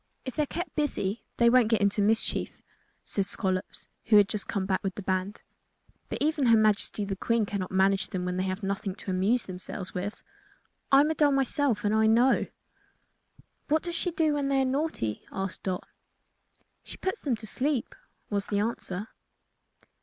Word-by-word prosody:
"If 260 - -5
they 305 - +1
are - - +2
kept 350 +5 -5
busy 240 -8 -1 0.2
they 235 - +5
won't 240 -1 +5
get 225 -2 +2
into 200 0 +2
mischief," 220 +2 0 0.4
said 200 - 0
Scollops, 185 -1 -2 0.2
who 220 - +4
had 200 -1 +5 0.2
come 195 -3 -1
back 190 -1 0
with 195 -1 -2
the 205 - -6
band; 190 +2 -2 0.7
"but - - -3
even 300 -3 +1
her 230 -1 +7
Majesty 215 -1 +2
the 195 -1 -3
Queen 230 +3 +1
cannot 200 -2 -3
manage 190 +1 +2
them 180 -1 -3
when 180 0 -2
they 185 - 0
have 190 +2 -3
nothing 195 0 -2
to 195 - -5
amuse 200 +6 +2
themselves 185 0 -7
with. 195 +3 -4 0.7
I'm 285 +3 +6
a - - +1
doll 295 -2 +3
myself 270 -4 +1
and 205 - +2
I 220 0 +4
know." 240 +4 +4 1.2
"What 310 +1 +2
does 345 - -3
she 345 +2 -1
do 320 -2 +1
when 285 -1 0
they 275 -1 +2
are - - +1
naughty?" 260 - -2
asked 190 -1 -4
Dot. 185 -2 -3 1.0
"She - - -9
puts 380 +4 -2
them 270 -5 0
to 220 - -9
sleep," 260 +4 -1 0.4
was 200 -1 -1
the 205 - -1
answer. 205 -2 -2
215 Hz, 185 wpm, -28 LUFS, 195-270 Hz, 1.2 s, her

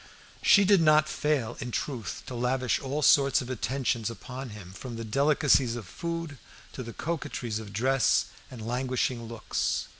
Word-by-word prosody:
She 200 -1 +6
did 195 -2 +5
not 155 -1 +5
fail, 140 -8 -1
in 125 - -4
truth, 120 -2 -4
to 130 - -7
lavish 125 +1 0
all 140 +3 -3
sorts 140 -1 +5
of 130 -2 -5
attentions 125 -1 -1
upon 125 +2 -7
him, 100 -4 -10
from 120 +4 -7
the 115 - -5
delicacies 135 0 +3
of 120 -4 -6
food 165 - -5 0.3
to - - -6
the 115 -2 -6
coquettries 145 -8 -3
of 105 -2 -9
dress 130 +4 +2 0.2
and 115 -4 -8
languishing 125 -1 -1
looks. 115 -1 -2
130 Hz, 160 wpm, -28 LUFS, 115-140 Hz, 0.3 s, She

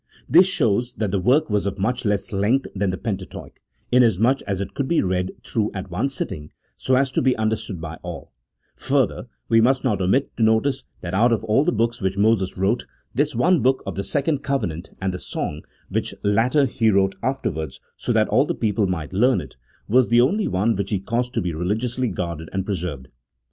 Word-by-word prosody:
This 180 +4 +6
shows 120 - +1
that 105 -4 -2
the 100 - +1
work 135 - +3
was 105 -2 0
of 100 0 -3
much 120 +6 -1
less 105 -1 0
length 110 +8 +2
than 100 -1 0
the 95 - -2
Pentateuch, 95 -4 -6 0.3
inasmuch 120 +1 +4
as 100 -2 -1
it 100 -1 -4
could 140 - -2
be 170 - +2
read 90 0 0 0.2
through 110 -4 0
at 95 -1 -6
one 105 +10 0
sitting 75 - -4 0.2
so 130 - +1
as 135 0 +2
to - - +1
be 130 -1 +3
understood 110 -4 -2
by 80 0 -7
all; - - -8 0.4
further, 135 -2 0 0.2
we 115 -1 +4
must 130 +3 +3
not 105 -7 0
omit 95 +10 +1
to - - -3
notice 120 +5 +2 0.2
that 85 0 -5
out 115 +5 +4
of 110 -1 +1
all 110 +5 +3
the - - +2
books 115 +1 -1
which 95 0 -1
Moses 100 -3 +2
wrote, 100 +6 0 0.3
this 145 0 0
one 165 +6 +3
book 130 +3 +2
of - - -4
the 100 - -3
second 145 - 0
covenant 95 - -3
and 95 -1 -1
the 90 - -5
song 75 -2 -4 0.3
(which - - -2
latter 120 +8 +3
he 115 -3 +1
wrote 95 -1 +3
afterwards 80 - -3 0.2
so - - -3
that - - +3
all - - +3
the - - -1
people 105 -2 0
might 80 -3 -4
learn 125 +7 +3
it), - - -9 0.3
was 125 +3 +3
the 120 0 +5
only 200 - +2
one 105 +5 +1
which 100 0 -3
he 105 - +1
caused 120 +5 -2
to - - +1
be 90 -2 -2
re 85 +3 -3
ligiously 120 +5 -1
guarded 85 -3 -4
and 95 -1 -1
preserved. 85 -10 -4
110 Hz, 210 wpm, -22 LUFS, 95-125 Hz, 0.4 s, This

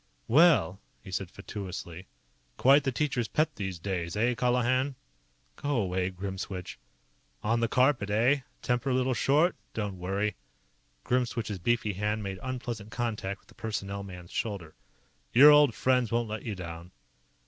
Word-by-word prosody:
"Well!" 135 - +5 0.2
he 95 - -10
said 95 -1 -3
fatuously. 95 -3 -7 0.5
"Quite 140 +2 +5
the 135 - +2
teacher's 130 -4 -1
pet, 155 -1 0
these 95 -3 -4
days. 85 -2 -3
Eh, 120 +3 +2
Colihan?" 125 +2 +1 0.6
"Go 145 0 -1
away, 95 -4 0
Grimswitch." 95 -2 -6 0.6
"On 115 +2 +1
the 115 - +2
carpet, 125 -4 +2
eh? 120 +7 +3 0.2
Temper 125 +2 0
a - - +2
little 130 0 +1
short? 150 +9 +3 0.2
Don't 105 -4 -3
worry." 100 +4 -1 0.7
Grimswitch's 120 -5 -1
beefy 110 +1 +1
hand 105 +3 -1
made 95 -1 -5
unpleasant 120 -5 -5
contact 110 -4 -3
with - - -31
the - - -16
Personnel 100 -2 -4
man's 90 -3 -10
shoulder. 100 -8 -3 0.6
"Your 145 +5 +9
old 145 -5 +6
friends 125 -3 +2
won't 115 -1 0
let 110 0 -4
you 110 -3 -3
down." 85 -1 -8
110 Hz, 150 wpm, -29 LUFS, 95-125 Hz, 0.7 s, Your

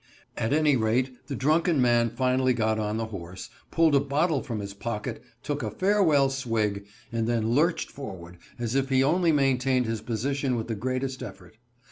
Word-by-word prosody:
At 110 - -1
any 150 -1 +4
rate, 125 +3 +1
the 140 - -4
drunken 155 +3 +2
man 120 -2 +3
finally 130 +2 +1
got 110 -2 0
on 105 0 -1
the 115 - -1
horse, 90 0 -8 0.2
pulled 165 -2 +3
a 140 - +6
bottle 145 +2 +1
from 115 -6 -4
his 100 -1 -6
pocket, 105 +1 -4 0.2
took - - -2
a - - -2
farewell 175 -9 +3
swig, 110 -6 -1 0.2
and 115 -1 -1
then 115 -1 0
lurched 165 +6 +1
forward 90 -10 -9 0.2
as 120 -1 -3
if 135 0 +1
he 130 0 +3
only 170 +4 +3
maintained 135 -3 +2
his 115 -1 -3
position 130 +3 -1
with 115 -2 -3
the - - 0
greatest 130 +4 -3
effort. 95 -3 -10
125 Hz, 180 wpm, -27 LUFS, 110-140 Hz, 0.2 s, a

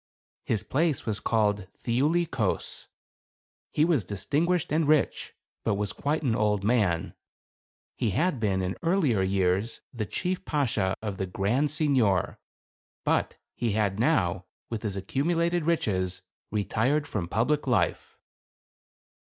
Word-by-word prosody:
His 110 -5 0
place 155 +1 0
was 110 -2 -1
called 105 -3 +1
Thiuli 150 +9 +1
Kos. 110 -8 -2 0.8
He 150 - +2
was 160 - +2
distinguished 145 - 0
and 155 0 +2
rich, 155 -1 +1 0.3
but - - +1
was 100 -1 -2
quite 150 +7 -1
an 120 -5 +1
old 105 -2 +1
man; 100 -7 +1 0.8
he 115 - 0
had 150 - +1
been, 95 -4 +1
in 90 +1 -2
earlier 165 - +2
years, 95 +3 0
the 110 -4 -3
chief 180 0 -2
Bashaw 110 -10 0
of 105 -3 -3
the 95 - -2
grand 110 +11 +1
signor, 130 - +1 0.7
but - - +1 0.2
he 115 -3 -1
had 100 -2 0
now, 95 - +2 0.3
with 115 -2 -3
his 100 -3 -3
accumulated 170 - 0
riches, 95 - 0 0.3
retired 110 +8 +1
from 95 -9 -3
public 130 - 0
life. 95 -9 0
110 Hz, 130 wpm, -27 LUFS, 100-150 Hz, 0.8 s, He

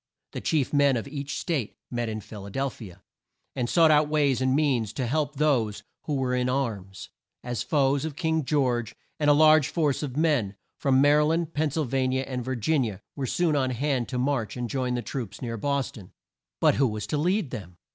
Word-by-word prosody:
The - - -5
chief 150 -5 0
men 140 -3 +4
of 115 - -4
each 140 0 -5
State 145 - -2
met 120 -2 -2
in 110 0 -4
Phil 100 -1 -10
a - - -7
del 135 +6 -1
phi 110 -5 -10
a, 90 - -17 0.5
and 120 -2 -1
sought 165 -2 +5
out 150 0 +4
ways 140 -5 +2
and 130 0 +2
means 130 -8 +1
to 130 +2 -2
help 150 +3 -1
those 130 -8 +1 0.2
who 150 - -1
were 130 -2 0
in 125 0 +1
arms, 110 -8 -3 0.3
as 120 -1 -3
foes 140 -2 +1
of 160 -3 -4
King 160 +1 0
George, 125 -5 0 0.2
and 150 -1 +3
a - - +7
large 155 -1 +6
force 150 -5 0
of 140 -3 -4
men, 145 -11 +1 0.2
from 135 -2 +3
Ma 145 - +6
ry 150 +1 +5
land, 165 +1 0
Penn 155 +1 +1
syl 155 +2 -1
va 130 +1 0
ni 130 +1 0
a, 135 - -2
and 125 -2 -4
Vir 130 +2 -2
gin 135 +5 +1
i - - -1
a, - - -15 0.2
were 135 -2 -3
soon 165 +3 +1
on 130 -2 +1
hand 130 0 -1
to 125 - -3
march 125 -3 -1
and 120 -2 -3
join 130 -2 -1
the 120 - -2
troops 120 -8 -5
near 115 -2 -4
Bos 140 +4 -1
ton. 95 -5 -13 0.5
But - - +4
who 135 - +4
was 105 -2 -4
to 150 - -2
lead 180 - 0
them? 90 -4 -8
135 Hz, 235 wpm, -26 LUFS, 120-150 Hz, 0.5 s, a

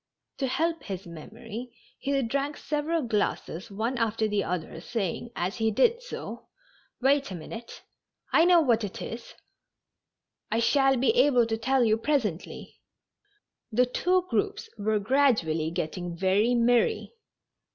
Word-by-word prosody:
To 270 - 0
help 330 +5 0
his 190 -2 -6
memory, 220 +8 -8 0.3
he 275 0 0
drank 275 +5 -2
several 305 +2 -1
glasses 210 -5 -2
one 225 +5 -2
after 225 -1 +1
the 210 -1 0
other, 165 -2 -4
saying, 225 +1 -3
as 180 +3 -2
he 225 -1 +2
did 470 - +3
so: - - -7 0.3
" - - -35
Wait 275 +1 +3
a 190 - -5
minute, 225 +8 -9 0.5
I 330 - +6
know 350 -1 +6
what 235 -6 +2
it 200 - -5
is. 230 +1 -7 1.1
I 225 - +1
shall 270 +2 +3
be 260 - +3
able 290 - +4
to 225 0 -1
tell 255 +3 +2
you 220 -1 +3
presently." 225 - -2 0.9
The 250 +3 +4
two 360 +8 +1
groups 410 +4 -1
were 215 +1 0
gradually 205 - +2
getting 170 +1 -4
very 200 +6 +2
merry. 245 - +2
235 Hz, 140 wpm, -27 LUFS, 205-280 Hz, 1.1 s, I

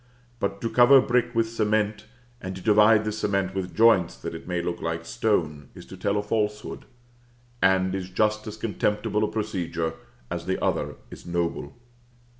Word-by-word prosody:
But 100 0 -2
to 115 - -1
cover 125 +3 +7
brick 120 -2 +1
with 115 0 +2
cement, 110 -1 -1 0.3
and 95 0 -5
to 95 - -8
divide 105 0 +5
this 105 0 -3
cement 100 -2 0
with 95 -2 -4
joints 110 -6 +4
that - - -6
it - - -9
may 90 -1 -1
look 85 0 -3
like 85 0 -3
stone, 80 - -1
is - - -11
to - - -11
tell 100 +2 -1
a 105 - -1
falsehood; 105 0 -2 0.8
and 95 0 +3
is 95 -1 -4
just 105 +3 0
as 110 0 -6
contemptible 105 -1 -1
a - - +2
procedure 85 -7 -2 0.4
as - - -4
the - - 0
other - - -1 0.2
is - - -11
noble. 85 -4 -2
105 Hz, 175 wpm, -25 LUFS, 90-110 Hz, 0.8 s, cover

